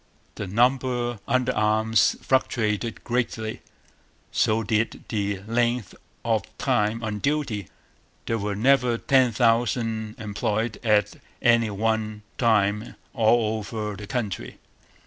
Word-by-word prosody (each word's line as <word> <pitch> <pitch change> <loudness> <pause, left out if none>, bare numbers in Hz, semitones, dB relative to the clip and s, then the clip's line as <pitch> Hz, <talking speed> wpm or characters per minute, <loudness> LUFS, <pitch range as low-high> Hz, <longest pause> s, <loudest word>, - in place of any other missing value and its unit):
The 100 - -5
number 120 +2 +1
under 130 0 +2
arms 110 +1 +3
fluctuated 115 -4 0
greatly; 120 -2 -2 0.7
so 110 +1 +2
did 110 +1 -1
the 100 -3 -2
length 120 -1 0 0.3
of - - +2 0.2
time 105 +2 0
on 105 -1 -3
duty. 135 - -1 0.6
There 115 0 -1
were 100 0 -2
never 125 +1 +3
ten 130 0 +3
thousand 115 -1 +1
employed 110 +1 -2
at 105 -2 +2 0.2
any 115 -2 +4
one 110 0 -1 0.2
time 105 -2 +2 0.2
all 110 -1 +2
over 105 0 -4
the 105 0 -9
country. 105 -5 -4
110 Hz, 110 wpm, -25 LUFS, 105-120 Hz, 0.7 s, any